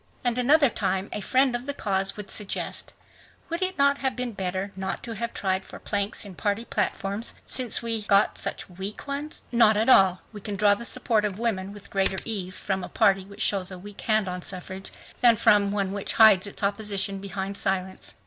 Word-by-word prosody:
And 245 Hz, -2 st, +1 dB
another 280 Hz, +1 st, +4 dB
time 190 Hz, +1 st, -1 dB
a -, -, -3 dB
friend 260 Hz, +4 st, +2 dB
of 240 Hz, +3 st, -4 dB
the 285 Hz, -, -2 dB
cause 195 Hz, -4 st, -1 dB
would 205 Hz, -2 st, -7 dB
suggest, 210 Hz, -2 st, -1 dB, 0.6 s
"Would 335 Hz, +2 st, -3 dB
it 375 Hz, 0 st, -1 dB
not 280 Hz, 0 st, +3 dB
have 265 Hz, -1 st, -1 dB
been 250 Hz, -1 st, -2 dB
better 190 Hz, 0 st, -3 dB
not 190 Hz, 0 st, -4 dB
to 235 Hz, -, -5 dB
have 235 Hz, +2 st, -4 dB
tried 190 Hz, -1 st, -1 dB
for -, -, -11 dB
planks 205 Hz, +1 st, -1 dB
in 200 Hz, -, -9 dB
party 205 Hz, +4 st, -2 dB
platforms, 200 Hz, +1 st, -2 dB
since 250 Hz, -3 st, +1 dB
we 230 Hz, -1 st, -1 dB
got 200 Hz, -1 st, +3 dB
such 200 Hz, -, -4 dB
weak 190 Hz, +3 st, -7 dB
ones?" 285 Hz, +2 st, -5 dB
"Not 225 Hz, -3 st, +5 dB
at 220 Hz, +4 st, +1 dB
all. 190 Hz, -6 st, +6 dB
We 205 Hz, -, -9 dB
can 205 Hz, +1 st, -4 dB
draw 205 Hz, +1 st, +4 dB
the 235 Hz, +4 st, -4 dB
support 230 Hz, -3 st, +1 dB
of 200 Hz, -2 st, -2 dB
women 205 Hz, -4 st, -2 dB
with 205 Hz, -1 st, -12 dB
greater 195 Hz, -1 st, +2 dB
ease 185 Hz, -5 st, 0 dB
from 190 Hz, -2 st, -2 dB
a -, -, -6 dB
party 195 Hz, -1 st, +2 dB
which 200 Hz, +1 st, -10 dB
shows 195 Hz, -2 st, +1 dB
a 185 Hz, -, -5 dB
weak 200 Hz, +2 st, -10 dB
hand 215 Hz, -3 st, +1 dB
on 180 Hz, 0 st, -4 dB
suffrage, 190 Hz, +1 st, -6 dB, 0.3 s
than 235 Hz, -2 st, +7 dB
from 205 Hz, -1 st, +4 dB
one 200 Hz, -2 st, -1 dB
which 200 Hz, 0 st, -3 dB
hides 210 Hz, -3 st, +6 dB
its 200 Hz, -, -6 dB
opposition 200 Hz, -1 st, 0 dB
behind 195 Hz, 0 st, -5 dB
silence." 190 Hz, -, -2 dB
205 Hz, 205 wpm, -26 LUFS, 195-230 Hz, 0.6 s, than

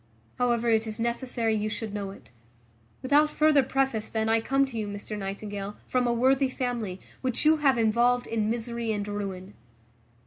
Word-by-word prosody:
However, 240 Hz, -1 st, +1 dB
it 225 Hz, -1 st, +2 dB
is 215 Hz, 0 st, -6 dB
necessary 235 Hz, -1 st, -1 dB
you 215 Hz, 0 st, -1 dB
should 215 Hz, -1 st, -5 dB
know 200 Hz, -2 st, -3 dB
it. 120 Hz, -, -13 dB, 0.7 s
Without 290 Hz, +3 st, +4 dB
further 305 Hz, -2 st, +4 dB
preface, 265 Hz, -4 st, -1 dB
then, 220 Hz, 0 st, -1 dB
I 225 Hz, 0 st, +4 dB
come 275 Hz, +4 st, +2 dB
to 265 Hz, -3 st, -10 dB
you, 210 Hz, -, -2 dB
Mr 205 Hz, +1 st, -6 dB
Nightingale, 200 Hz, 0 st, -5 dB
from 250 Hz, -1 st, +1 dB
a -, -, +2 dB
worthy 260 Hz, +3 st, +3 dB
family, 240 Hz, -8 st, -3 dB, 0.2 s
which 255 Hz, +2 st, 0 dB
you 315 Hz, +1 st, +6 dB
have 275 Hz, -4 st, +3 dB
involved 235 Hz, +2 st, +3 dB
in 220 Hz, -2 st, -1 dB
misery 235 Hz, 0 st, -2 dB
and 205 Hz, -1 st, -2 dB
ruin." 200 Hz, -2 st, -5 dB
230 Hz, 175 wpm, -27 LUFS, 210-255 Hz, 0.7 s, you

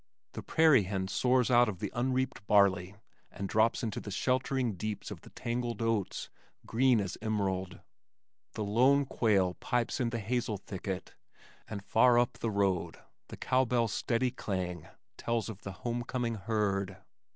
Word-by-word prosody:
The -, -, -6 dB
prairie 155 Hz, -10 st, +4 dB
hen 95 Hz, 0 st, -2 dB
soars 125 Hz, +2 st, +2 dB
out 120 Hz, -1 st, +5 dB
of 100 Hz, -, -5 dB
the -, -, -4 dB
unreaped 125 Hz, -3 st, -1 dB
barley 100 Hz, -2 st, +3 dB, 0.3 s
and 100 Hz, -1 st, -5 dB
drops 110 Hz, +4 st, +2 dB
into 110 Hz, -3 st, -2 dB
the -, -, -8 dB
sheltering 125 Hz, +2 st, 0 dB
deeps 105 Hz, +3 st, -5 dB
of -, -, -8 dB
the -, -, -14 dB
tangled 120 Hz, 0 st, -3 dB
oats, 115 Hz, -4 st, -1 dB, 0.3 s
green 125 Hz, 0 st, +3 dB
as 95 Hz, -2 st, -4 dB
emerald. 95 Hz, -4 st, -2 dB, 0.7 s
The 110 Hz, -, -3 dB
lone 130 Hz, +7 st, +4 dB
quail 100 Hz, -8 st, +2 dB
pipes 120 Hz, -1 st, -1 dB
in 120 Hz, -2 st, +1 dB
the 115 Hz, -, -3 dB
hazel 115 Hz, 0 st, -1 dB
thicket, 95 Hz, -1 st, -6 dB, 0.5 s
and 100 Hz, -2 st, -7 dB
far 120 Hz, +1 st, +5 dB
up 120 Hz, +1 st, +1 dB
the 115 Hz, -, -1 dB
road 100 Hz, -4 st, 0 dB, 0.3 s
the -, -, -9 dB
cow 130 Hz, +1 st, +2 dB
bell's 115 Hz, -4 st, +1 dB
steady 125 Hz, +2 st, 0 dB
clang 90 Hz, -, -4 dB, 0.3 s
tells 115 Hz, -1 st, -1 dB
of 105 Hz, -2 st, -8 dB
the 100 Hz, -, -6 dB
homecoming 120 Hz, 0 st, -2 dB
herd. 100 Hz, -3 st, -1 dB
110 Hz, 155 wpm, -31 LUFS, 100-120 Hz, 0.7 s, out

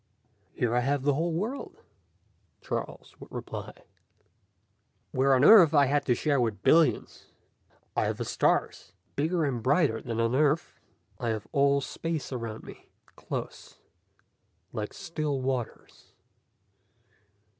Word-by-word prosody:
"Here 120 Hz, -2 st, 0 dB
I 120 Hz, -, +3 dB
have 140 Hz, +2 st, -1 dB
a 145 Hz, -, +4 dB
whole 165 Hz, +5 st, -1 dB
world," 215 Hz, +12 st, -4 dB, 0.8 s
Charles -, -, -5 dB
would -, -, -13 dB
reply, -, -, -7 dB, 1.3 s
"where 135 Hz, -1 st, +3 dB
on 130 Hz, -, +3 dB
Earth 175 Hz, -7 st, +8 dB
I 145 Hz, -1 st, +6 dB
had 145 Hz, +2 st, 0 dB
to 125 Hz, -, +3 dB
share 140 Hz, 0 st, +1 dB
with 110 Hz, -4 st, -2 dB
billions. 165 Hz, 0 st, +2 dB, 0.7 s
I -, -, +1 dB
have -, -, -2 dB
the -, -, -4 dB
stars, 90 Hz, -, 0 dB, 0.2 s
bigger 160 Hz, +3 st, 0 dB
and 125 Hz, -5 st, -2 dB
brighter 135 Hz, -3 st, +2 dB
than 115 Hz, -1 st, -4 dB
on 115 Hz, +1 st, +1 dB
Earth. 150 Hz, +3 st, +1 dB, 0.4 s
I 120 Hz, -, -2 dB
have 110 Hz, -1 st, -3 dB
all 140 Hz, 0 st, +3 dB
space 165 Hz, +1 st, -4 dB
around 115 Hz, -4 st, -5 dB
me, -, -, -13 dB, 0.3 s
close, -, -, -7 dB, 1.0 s
like 105 Hz, -1 st, -4 dB
still 155 Hz, -6 st, -3 dB
waters. 130 Hz, -3 st, -5 dB
140 Hz, 130 wpm, -28 LUFS, 120-155 Hz, 1.3 s, Earth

